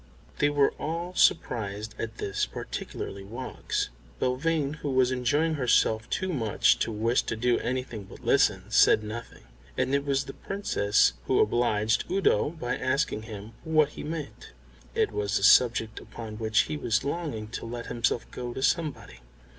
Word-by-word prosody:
They 145 - +4
were 145 -1 +3
all 170 +3 -3
surprised 110 - +1
at 115 0 -5
this, 100 - -1
particularly 100 0 -6
Woggs. 120 +6 -3 0.3
Belvane, 145 +3 0
who 145 - -4
was 130 -1 +3
enjoying 145 +6 +1
herself 120 -5 +2
too 190 -1 -1
much 115 -7 +2
to 115 - 0
wish 115 +3 +1
to 110 - -3
do 120 +2 +2
anything 125 -4 -3
but - - -13
listen, - - +3
said 110 - +5
nothing, 110 - -8 0.3
and 130 +1 0
it 140 0 +2
was 140 -1 +1
the 135 - -8
Princess 110 - +1
who - - +3
obliged 110 -2 +2
Udo 190 - +2
by 155 -6 -3
asking 130 -3 0
him 105 0 -8
what 155 -2 +3
he - - -9
meant. 155 - -6 0.4
It - - +2
was 105 0 0
a - - -3
subject 115 0 +5
upon 110 -2 -9
which 110 -1 +3
he 75 - -3
was 110 +9 0
longing 140 -8 -3
to 115 - -6
let 120 0 -5
himself 120 0 -1
go 120 -1 -6
to 130 - -3
somebody. 150 - -1
120 Hz, 160 wpm, -27 LUFS, 110-145 Hz, 0.4 s, said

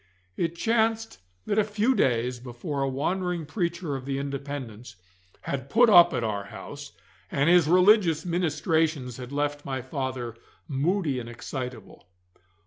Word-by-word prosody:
It 170 -1 -1
chanced 225 - 0 0.3
that 205 - +1
a - - +4
few 215 +4 +1
days 125 - +1
before 125 +4 -5
a 135 - +1
wandering 175 +5 -2
preacher 170 -2 -2
of 130 -1 -6
the 135 0 -2
Independents 140 -4 -6 0.5
had 135 -1 -4
put 235 +4 +5
up 175 -2 +8
at 120 - -2
our 105 -3 -2
house, - - -9 0.4
and 145 +5 +2
his 175 -4 +5
religious 180 -2 +4
ministrations 160 -6 0
had 125 0 -8
left 145 0 -2
my 135 -1 -3
father 130 -3 -4 0.3
moody 150 0 0
and 120 -1 -7
excitable. 120 -3 -7
145 Hz, 140 wpm, -26 LUFS, 130-180 Hz, 0.5 s, up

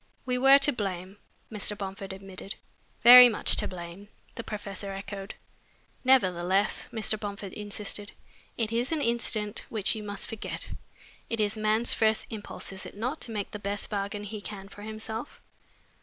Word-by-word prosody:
"We 250 -1 0
were 270 +2 +9
to 280 +1 +2
blame," 195 -3 -4 0.3
Mr. 210 -1 -1
Bomford 195 -1 -6
admitted. 195 0 -8 0.5
"Very 245 +1 +12
much 220 - 0
to - - +1
blame," 175 +2 -8 0.3
the 230 - -6
professor 200 -2 -5
echoed. 195 0 -7 0.7
"Nevertheless," 195 -7 +2
Mr. 220 -2 -1
Bomford 200 -2 -6
insisted, 205 0 -3 0.5
"it 225 -2 -1
is 240 +4 0
an 320 - +1
incident 230 -3 0
which 215 -4 +1
you 220 - -5
must 205 -1 -3
forget. 225 -3 -6 0.6
It 230 - -2
is 210 0 +1
man's 215 +2 +3
first 220 -1 +2
impulse, 210 -3 -6
is 190 - -8
it - - -13
not, 250 +8 -3
to 230 - -3
make 205 -3 -3
the 210 - -6
best 200 +1 -3
bargain 205 0 -3
he 210 0 -6
can 195 -1 -7
for 205 - -12
himself? 220 +3 -6
210 Hz, 160 wpm, -28 LUFS, 195-225 Hz, 0.7 s, Very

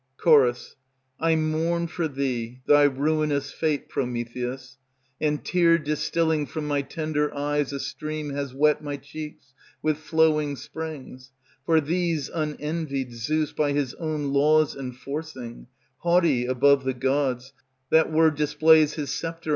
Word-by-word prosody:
Ch. 170 - 0 0.9
I 165 0 +2
mourn 160 +2 0
for 170 0 -2
thee 130 -4 -3
thy 145 0 +6
ruinous 145 0 0
Fate, 155 -2 -1
Prometheus, 125 +2 -4 0.4
And 150 -1 0
tear 170 -2 +4
distilling 155 0 0
from 155 -1 -5
my 145 -1 +1
tender 150 +1 -2
Eyes 145 0 -1
a 140 - -4
stream 155 +1 -5
has 140 -1 -3
wet 150 +3 +2
My 145 -1 -4
cheeks 140 -1 -10 0.3
with 155 -1 +1
flowing 155 -2 +2
springs; 135 -4 -8 0.3
For 160 -1 +5
these, 165 -1 -1
unenvied, 150 -4 -3
Zeus 150 +6 -1
By 145 -2 0
his 140 -3 -1
own 155 -4 -3
laws 155 +2 +3
enforcing, 130 - -7 0.3
Haughty 170 -8 +2
above 135 +2 +4
the 130 -1 -1
gods 130 0 -1 0.4
That 160 0 +4
were 160 0 +4
displays 150 +1 +4
his 150 -3 -3
sceptre. 165 -1 -5
150 Hz, 130 wpm, -25 LUFS, 135-155 Hz, 0.9 s, thy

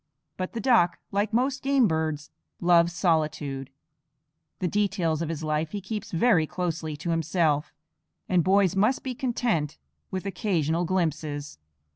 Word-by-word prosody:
But 185 0 -4
the 230 - -3
duck, 225 -7 +3
like 205 +2 0
most 255 +4 +1
game 270 -3 +3
birds, 155 -3 -2 0.3
loves 170 -1 +4
solitude; 150 -6 0 0.9
the 185 - -1
details 185 -5 0
of 165 - -2
his 160 -1 -4
life 155 +2 -1
he 205 - -2
keeps 205 +2 -5
very 170 -3 +3
closely 165 -4 -3
to 170 +4 -3
himself; 165 -2 +1 0.6
and 180 -2 +3
boys 190 +1 +3
must 215 +7 +2
be 260 - -3
content 235 - -1 0.3
with 190 0 -4
occasional 175 -4 0
glimpses. 155 - -2
175 Hz, 140 wpm, -26 LUFS, 155-205 Hz, 0.9 s, loves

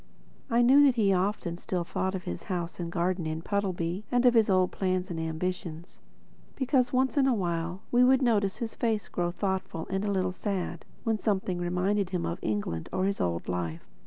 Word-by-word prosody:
I 235 0 +4
knew 270 +4 +7
that 265 -3 +4
he 205 -4 +3
often 185 -2 -1
still 180 0 -2
thought 190 +2 -2
of 185 - -5
his 85 0 -6
house 175 -2 -3
and 170 -1 -4
garden 175 0 0
in 160 +1 -3
Puddleby 185 -2 -1
and 245 0 +3
of 245 - +7
his 225 -3 +4
old 185 -1 +3
plans 185 -1 -1
and 165 - -3
ambitions; 160 0 -4 0.6
because 255 -2 +2
once 265 +3 +1
in 270 -1 +4
a 255 - +3
while 175 -1 -2
we 245 +1 +5
would 260 +1 +5
notice 205 -5 +2
his 230 -2 -4
face 220 -4 -1
grow 175 -1 -1
thoughtful 190 -3 -2
and 195 +1 0
a 205 - 0
little 185 -2 +1
sad, 185 -3 -3 0.2
when 225 -2 0
something 190 -4 0
reminded 180 +3 0
him 180 -2 -2
of 170 0 -3
England 100 -6 -2
or 185 - 0
his 200 0 -1
old 85 -1 -1
life. 85 -2 -3
185 Hz, 200 wpm, -28 LUFS, 170-215 Hz, 0.6 s, knew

